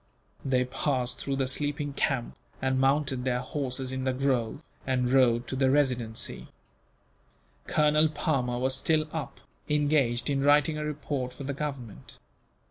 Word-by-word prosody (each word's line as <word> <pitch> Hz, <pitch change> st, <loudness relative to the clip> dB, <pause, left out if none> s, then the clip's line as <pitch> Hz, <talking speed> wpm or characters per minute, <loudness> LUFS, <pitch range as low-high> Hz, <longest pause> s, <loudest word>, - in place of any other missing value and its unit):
They 130 Hz, -2 st, +1 dB
passed 125 Hz, -1 st, -1 dB
through 140 Hz, -, -2 dB
the 135 Hz, -1 st, 0 dB
sleeping 145 Hz, +1 st, -2 dB
camp, 135 Hz, -3 st, -1 dB, 0.2 s
and 130 Hz, 0 st, 0 dB
mounted 135 Hz, -1 st, +1 dB
their 125 Hz, -1 st, 0 dB
horses 130 Hz, -2 st, -2 dB
in 130 Hz, 0 st, -3 dB
the 130 Hz, 0 st, 0 dB
grove, 130 Hz, 0 st, -1 dB, 0.2 s
and 125 Hz, -1 st, +1 dB
rode 120 Hz, -2 st, +4 dB
to -, -, -3 dB
the 130 Hz, 0 st, +2 dB
Residency. 125 Hz, -5 st, 0 dB, 1.2 s
Colonel 150 Hz, +1 st, +3 dB
Palmer 135 Hz, -5 st, -1 dB
was 130 Hz, +2 st, +1 dB
still 155 Hz, +1 st, +2 dB
up, 160 Hz, -3 st, -5 dB, 0.3 s
engaged 145 Hz, -5 st, +2 dB
in 140 Hz, -2 st, +1 dB
writing 145 Hz, +2 st, +3 dB
a -, -, -2 dB
report 145 Hz, -4 st, -3 dB
for -, -, -8 dB
the 140 Hz, +1 st, -3 dB
Government. 135 Hz, -, -6 dB
135 Hz, 145 wpm, -28 LUFS, 125-145 Hz, 1.2 s, rode